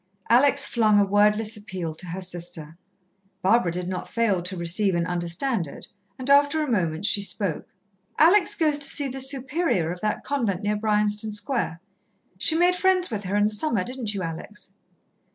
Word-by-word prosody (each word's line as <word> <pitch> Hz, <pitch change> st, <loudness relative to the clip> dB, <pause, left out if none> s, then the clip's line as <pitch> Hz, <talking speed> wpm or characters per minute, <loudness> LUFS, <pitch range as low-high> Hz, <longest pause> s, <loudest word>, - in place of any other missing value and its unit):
Alex 275 Hz, +3 st, +4 dB
flung 215 Hz, -3 st, +3 dB
a 200 Hz, -, +4 dB
wordless 210 Hz, +2 st, +2 dB
appeal 185 Hz, -6 st, -6 dB
to 175 Hz, +3 st, -7 dB
her 180 Hz, +3 st, -6 dB
sister. 175 Hz, -3 st, -6 dB, 0.7 s
Barbara 195 Hz, -2 st, +3 dB
did 180 Hz, +1 st, -3 dB
not 185 Hz, -1 st, -5 dB
fail 220 Hz, -6 st, 0 dB
to 180 Hz, +2 st, -4 dB
receive 180 Hz, +3 st, +2 dB
and 170 Hz, -1 st, 0 dB
understand 175 Hz, -, -1 dB
it, -, -, -10 dB, 0.3 s
and 255 Hz, -, -7 dB
after 285 Hz, +2 st, +4 dB
a 290 Hz, -, -3 dB
moment 170 Hz, -4 st, -1 dB
she 205 Hz, -, +3 dB
spoke: 200 Hz, -4 st, -2 dB, 0.4 s
"Alex 355 Hz, +5 st, +4 dB
goes 305 Hz, -3 st, +1 dB
to 285 Hz, -, -3 dB
see 285 Hz, -, +1 dB
the 265 Hz, 0 st, -5 dB
Superior 265 Hz, -, 0 dB
of 180 Hz, 0 st, -8 dB
that 215 Hz, 0 st, -2 dB
convent 230 Hz, -10 st, -2 dB
near 210 Hz, +1 st, 0 dB
Bryanston 210 Hz, 0 st, 0 dB
Square. 205 Hz, -6 st, -3 dB, 0.6 s
She 315 Hz, -, +3 dB
made 355 Hz, +1 st, +3 dB
friends 370 Hz, -3 st, +1 dB
with 205 Hz, -2 st, -4 dB
her 190 Hz, +3 st, -2 dB
in 205 Hz, -, +2 dB
the 210 Hz, -, +1 dB
summer, 215 Hz, -2 st, +2 dB
didn't 240 Hz, -2 st, -3 dB
you, 190 Hz, -, -3 dB
Alex?" 180 Hz, +5 st, -7 dB
210 Hz, 180 wpm, -24 LUFS, 180-265 Hz, 0.7 s, Alex